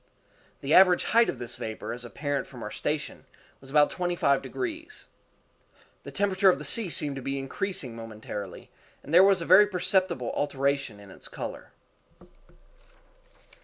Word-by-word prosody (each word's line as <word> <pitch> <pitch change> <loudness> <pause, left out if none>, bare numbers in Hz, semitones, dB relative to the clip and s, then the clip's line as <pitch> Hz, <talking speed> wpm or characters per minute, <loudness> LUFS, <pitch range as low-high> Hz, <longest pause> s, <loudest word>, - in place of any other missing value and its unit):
The 140 +3 0
average 180 -1 +6
height 235 +1 +3
of - - -3
this 120 - -7
vapor, 110 +1 -5
as 120 0 -7
apparent 145 +3 -3
from - - -10
our - - -6
station, - - -4 0.3
was 135 - -15
about 145 +1 +4
twenty 175 -1 -2
five 140 -5 +2
degrees. 330 -3 -6 0.9
The - - -10
temperature 195 -1 +3
of 180 - +3
the 150 - -8
sea 200 +7 +2
seemed 145 -3 0
to - - -5
be 135 +2 -2
increasing 135 -1 -3
momentarily, 110 -4 -8 0.3
and 150 - -8
there 180 +2 +8
was 195 -2 +4
a - - -4
very 190 +4 +7
perceptible 180 - 0
alteration 140 -5 -1
in 100 -1 -14
its - - -9
color. - - -7
145 Hz, 160 wpm, -27 LUFS, 130-190 Hz, 0.9 s, there